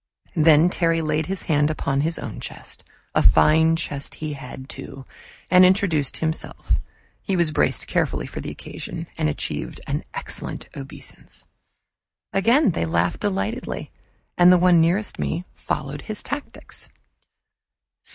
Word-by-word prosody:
Then 160 +1 +6
Terry 165 -2 +2
laid 155 0 0
his 195 0 -3
hand 150 -2 +2
upon 140 -3 0
his 165 +3 0 0.2
chest - - -7 0.3
a - - +3
fine 160 +1 +5
chest 145 -3 -3
he 155 -1 -4
had, 130 -1 -9
too, 135 -1 -9 0.5
and 180 0 +8
introduced 180 -7 +3
himself; 160 0 -2 0.4
he 195 - -1
was 170 -3 +3
braced - - +1
carefully 60 0 0
for - - -7
the - - -5
occasion - - -7
and 75 - +1
achieved 75 - -3
an - - -2
excellent - - -4
obeisance. 65 - -9 0.9
Again 230 +5 +4
they 85 - -1
laughed 85 +2 +1
delightedly, 210 +4 -3 0.5
and 175 0 +8
the 180 - +7
one 175 -1 +5
nearest 185 +5 +1
me 170 +3 -2
followed 140 +1 -4
his 215 - -6
tactics. 290 0 -7
160 Hz, 135 wpm, -23 LUFS, 145-185 Hz, 0.9 s, and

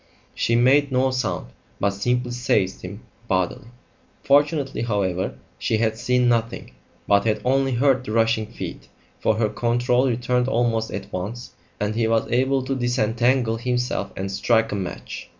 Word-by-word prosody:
She 115 - +1
made 135 +4 +4
no 130 +1 +2
sound, 120 - -2 0.3
but 100 - +2
simply 125 +5 -1
seized 110 -6 0
him 100 +4 -8 0.3
bodily. 95 +6 -1 0.6
Fortunately, 145 0 +2
however, 100 -5 -1 0.2
she 110 - 0
had 110 0 +1
seen 125 +1 +1
nothing, 115 -1 -1 0.4
but 100 0 +4
had 110 -1 +1
only 135 +1 +2
heard 130 +1 +2
the 125 - -6
rushing 115 -1 +2
feet, 115 - -8 0.3
for 110 - +2
her 110 0 +1
control 120 +3 +1
returned 125 +1 0
almost 115 -3 +1
at - - -7
once, 105 +7 -5 0.3
and 105 +1 -1
he 115 0 +1
was 115 0 +2
able 130 +2 +2
to 135 +1 -2
disentangle 120 -1 +1
himself 125 -4 -2
and 95 0 -3
strike 115 +3 +2
a - - -1
match. 95 -3 -6
120 Hz, 155 wpm, -23 LUFS, 110-125 Hz, 0.6 s, made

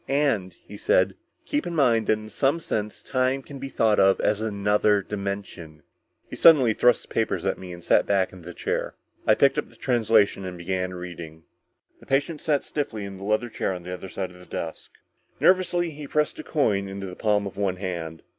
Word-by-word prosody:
"And," 135 -10 +1
he 105 - -9
said, 95 -1 +2 0.3
"keep 295 0 -1
in 170 - -4
mind 120 -7 +3
that - - +5
in 110 0 -5
some 140 +9 +1
sense 105 -9 -3
time 130 +1 0
can 140 0 -10
be 135 +1 -5
thought 110 -4 +2
of 95 0 +5
as 105 0 +1
another 105 -1 +2
dimension." 100 -6 -6 0.4
He - - -8
suddenly 135 -9 +6
thrust 120 +1 +3
the - - -17
papers 100 -5 0
at 95 - 0
me 90 -1 -8
and 85 -1 -9
sat - - +3
back 95 -2 +1
in 95 - -12
the 90 +1 -10
chair. - - -2 0.3
I - - +6
picked - - +3
up - - -5
the - - -20
translation 110 -5 +2
and 90 -1 -6
began 90 +1 -2
reading. 85 -3 -8 0.6
The - - -18
patient 145 +3 0
sat 145 -3 +1
stiffly 110 -8 -3
in 100 -1 -8
the 95 - -10
leather 110 +3 0
chair 95 - -1
on 90 -1 -7
the 90 +1 -6
other 90 +1 -7
side 95 -1 -4
of 90 - -15
the 90 - -14
desk. 80 - -6 0.5
Nervously 175 -2 +3
he 150 -1 -8
pressed 150 +1 0
a - - -5
coin 105 -10 +1
into 95 0 -6
the 90 -1 -7
palm 105 -1 +1
of 100 - -6
one 100 -2 0
hand. 85 -4 -5
105 Hz, 210 wpm, -25 LUFS, 95-130 Hz, 0.6 s, suddenly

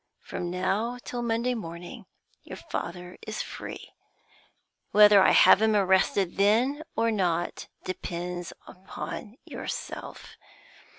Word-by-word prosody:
From 180 -2 -5
now 195 +7 -1
till 245 - -4
Monday 235 +1 0
morning 175 -5 -8 0.3
your - - -9
father 180 +1 -6
is 215 - -3
free. - - -9 1.0
Whether 210 -1 +7
I - - +6
have 200 - +7
him 220 -1 +3
arrested 190 -1 +2
then 235 +9 +3
or 230 0 +2
not 175 -5 -1 0.2
depends 175 -1 -5 0.2
upon 190 +3 -8
yourself. - - -7
195 Hz, 110 wpm, -27 LUFS, 180-220 Hz, 1.0 s, Whether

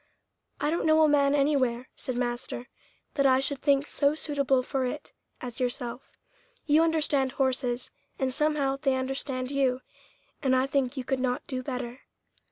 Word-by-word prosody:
"I 295 +1 0
don't 335 - 0
know 315 0 +6
a - - +6
man 285 -1 +4
anywhere," 260 -4 +1
said 255 -3 -4
master, 240 +1 -3 0.4
"that 275 -1 +3
I 260 0 +5
should 275 0 -2
think 280 -1 +3
so 290 0 +2
suitable 280 -4 +1
for 265 +1 -1
it 265 +4 -4 0.3
as 245 +1 -7
yourself. 245 0 -3 0.6
You 305 +1 +5
understand 300 -5 +2
horses, 255 -2 0 0.3
and 260 -1 0
somehow 295 -2 +1
they 270 -1 +1
understand 260 0 -3
you, 265 -2 +1 0.6
and 260 -2 +3
I 260 +1 +3
think 270 -1 0
you 260 - -2
could 265 +1 -1
not 250 -1 -1
do 255 -1 -3
better." 250 -1 -5
270 Hz, 165 wpm, -28 LUFS, 255-285 Hz, 0.6 s, know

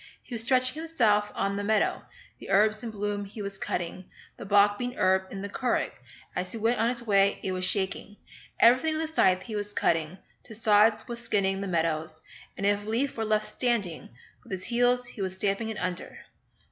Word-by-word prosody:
He - - -11
was 230 - 0
stretching 255 +4 +2
himself 220 -11 +2
on 195 0 -1
the 205 - -2
meadow, 215 +1 +1 0.4
The - - -11
herbs 215 +4 +3
in 235 - -4
bloom 205 -1 -3
he 205 +3 -11
was 200 -1 -6
cutting, 175 +1 -4 0.3
The - - -9
bog 205 0 +4
bean 245 0 -3
herb 190 -1 +2
in 195 0 -6
the - - -3
curragh, 245 +4 -1 0.4
As 180 0 -2
he - - -4
went 225 +2 +1
on 230 - +3
his 240 -1 -2
way 200 -2 +3
it 190 - -1
was 185 0 0
shaking, 200 +1 -1 0.4
Everything 260 +7 +5
with 310 - -1
his - - -15
scythe 185 - +3
he 220 - -6
was 205 0 -4
cutting, 165 +2 0 0.3
To 220 - -9
sods 215 0 +4
was 235 -1 -5
skinning 195 -4 0
the 200 - -3
meadows, 160 -2 -2 0.3
And 200 - -2
if 205 0 +2
a 210 - -7
leaf 260 +5 0
were 225 - -2
left 215 -1 0
standing, 230 -10 -1 0.3
With - - -16
his 185 -1 -4
heels 245 +1 +2
he 240 -4 -7
was 190 -1 -2
stamping 200 +3 -1
it 220 - -5
under. 180 0 -4
205 Hz, 210 wpm, -27 LUFS, 195-230 Hz, 0.4 s, Everything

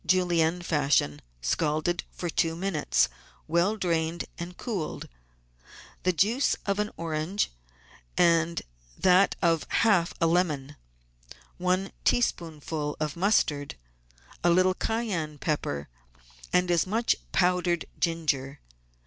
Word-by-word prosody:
Julienne 175 -1 +2
fashion, 140 - +1 0.2
scalded 155 - 0
for 175 - -5
two 165 0 0
minutes, 175 -3 +1 0.4
well 175 +7 +2
drained, 170 -3 -1
and 175 +1 -6
cooled), 200 -10 -4 0.9
the 185 - +2
juice 215 - +2
of 200 0 0
an 210 0 0
orange 165 +4 -1 0.7
and 170 -1 +3 0.3
that 185 +2 +4
of 165 -2 +2
half 195 -7 +3
a 165 - +3
lemon, 155 -5 0 0.8
one 185 +2 0
teaspoonful 155 - -1
of 155 -1 -2
mustard, 165 -7 +1 0.7
a 175 - +4
little 185 +2 +4
cayenne 185 -9 -2
pepper, 105 - -2 0.6
and 180 0 +2
as 170 +1 +2
much 225 +4 +2 0.2
powdered 180 -1 +2
ginger. 150 -5 -1
170 Hz, 105 wpm, -27 LUFS, 155-185 Hz, 0.9 s, that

